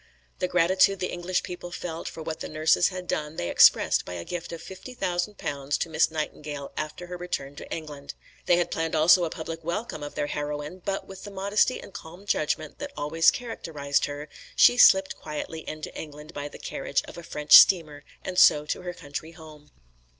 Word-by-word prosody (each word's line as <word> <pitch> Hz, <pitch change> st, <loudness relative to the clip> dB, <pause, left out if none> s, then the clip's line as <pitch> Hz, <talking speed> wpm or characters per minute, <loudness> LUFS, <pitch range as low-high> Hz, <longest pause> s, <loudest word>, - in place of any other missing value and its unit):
The 180 Hz, -, 0 dB
gratitude 185 Hz, +2 st, +3 dB
the 185 Hz, -, -2 dB
English 180 Hz, +1 st, -2 dB
people 175 Hz, 0 st, -7 dB
felt 170 Hz, -2 st, -6 dB
for 160 Hz, -, -7 dB
what 155 Hz, 0 st, -5 dB
the -, -, -6 dB
nurses 155 Hz, +3 st, +3 dB
had 185 Hz, -1 st, -6 dB
done 150 Hz, +1 st, -3 dB
they 85 Hz, -, -3 dB
expressed -, -, +5 dB
by 90 Hz, -, -8 dB
a 85 Hz, -1 st, -6 dB
gift 170 Hz, -1 st, -5 dB
of 170 Hz, -, -6 dB
fifty 190 Hz, +9 st, -10 dB
thousand 180 Hz, 0 st, -2 dB
pounds 140 Hz, 0 st, -2 dB
to -, -, -3 dB
Miss 160 Hz, 0 st, +3 dB
Nightingale 150 Hz, -2 st, -5 dB
after 155 Hz, +3 st, -5 dB
her 180 Hz, 0 st, -7 dB
return 145 Hz, -6 st, -5 dB
to -, -, -10 dB
England. 150 Hz, -3 st, -7 dB, 0.3 s
They 175 Hz, -, +5 dB
had 175 Hz, 0 st, 0 dB
planned 165 Hz, 0 st, -1 dB
also 170 Hz, +3 st, +6 dB
a -, -, -3 dB
public 165 Hz, +1 st, -6 dB
welcome 170 Hz, 0 st, -4 dB
of 145 Hz, 0 st, -7 dB
their -, -, -1 dB
heroine, 145 Hz, +4 st, -4 dB
but 195 Hz, 0 st, -3 dB
with 190 Hz, -1 st, -11 dB
the 205 Hz, -, -7 dB
modesty 200 Hz, +5 st, +1 dB
and -, -, -12 dB
calm 175 Hz, +5 st, -10 dB
judgment 155 Hz, -6 st, -1 dB
that 285 Hz, -1 st, -6 dB
always 165 Hz, +3 st, +4 dB
characterised 150 Hz, -12 st, -2 dB
her, 145 Hz, +1 st, -6 dB, 0.3 s
she 245 Hz, -, +7 dB
slipped 190 Hz, -5 st, +6 dB
quietly 155 Hz, +1 st, -6 dB
into 155 Hz, 0 st, -7 dB
England 150 Hz, 0 st, -9 dB
by 145 Hz, 0 st, -5 dB
the -, -, -11 dB
carriage -, -, -2 dB
of -, -, -11 dB
a 170 Hz, -, -8 dB
French 150 Hz, -3 st, -7 dB
steamer 155 Hz, -6 st, +6 dB, 0.2 s
and 185 Hz, 0 st, 0 dB
so 150 Hz, 0 st, +6 dB
to 150 Hz, -, -3 dB
her 180 Hz, -1 st, -6 dB
country 155 Hz, +1 st, -7 dB
home. 155 Hz, -2 st, -14 dB
165 Hz, 200 wpm, -26 LUFS, 150-180 Hz, 0.3 s, she